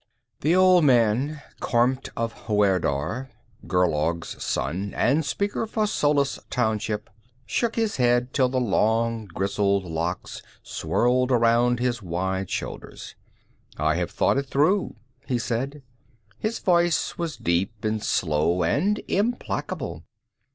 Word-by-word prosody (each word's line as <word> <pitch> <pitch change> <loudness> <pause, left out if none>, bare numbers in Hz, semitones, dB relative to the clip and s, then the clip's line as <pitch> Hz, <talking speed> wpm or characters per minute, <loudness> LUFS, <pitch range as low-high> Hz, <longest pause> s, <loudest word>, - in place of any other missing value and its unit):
The 160 +5 +2
old 185 -2 +6
man, 130 +3 +2 0.2
Kormt 125 +2 +1
of 115 0 -1
Huerdar, 100 - +1 0.4
Gerlaug's 85 -2 0
son, 100 +4 -2
and 145 +6 +2
Speaker 200 +9 -2
for 215 0 0
Solis 145 -7 +1
Township, 110 -3 -1 0.4
shook 230 - -1
his 225 -2 0
head 125 0 +2
till 130 -2 +3
the 130 0 0
long, 115 0 +1
grizzled 100 +1 0
locks 85 +1 -4 0.2
swirled 125 +2 +1
around 120 0 +3
his 120 -1 -1
wide 95 +1 -2
shoulders. - - -6 0.6
"I 75 +1 +2
have 90 -2 -1
thought - - +1
it 140 - -4
through," 160 +10 +1 0.3
he 130 -3 +1
said. 130 +5 -3 0.6
His 220 +2 -2
voice 175 -2 +1
was 170 -2 -3
deep 95 +6 -1
and 110 0 -1
slow 85 +2 +1
and 205 - +1
implacable. 230 +5 -2
120 Hz, 120 wpm, -25 LUFS, 95-140 Hz, 0.6 s, old